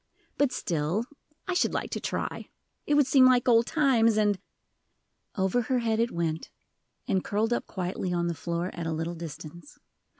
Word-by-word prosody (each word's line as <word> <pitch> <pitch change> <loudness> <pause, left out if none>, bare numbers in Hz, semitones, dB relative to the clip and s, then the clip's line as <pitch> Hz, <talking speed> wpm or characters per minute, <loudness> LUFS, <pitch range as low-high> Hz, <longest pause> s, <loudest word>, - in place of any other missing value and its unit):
"But 285 -3 +2
still, 170 +2 -1 0.4
I 370 - 0
should 355 - +1
like - - -3
to - - -2
try; - - -4 0.4
it 295 - +3
would 290 -1 +5
seem 260 0 +6
like 255 0 +3
old 230 -1 +5
times, 235 -8 +3
and 205 -2 +2 0.5
" - - -49
Over 190 +5 +2
her 255 +2 0
head 225 -2 0
it 230 +1 +2
went, 165 -5 -3 0.6
and 190 -1 +1
curled 220 +3 0
up - - -2
quietly 185 -1 -3
on 175 -1 0
the 170 - 0
floor 170 +2 -3
at 170 -1 -4
a 160 - -1
little 165 +2 -3
distance. 165 - -9
205 Hz, 180 wpm, -28 LUFS, 170-245 Hz, 0.6 s, seem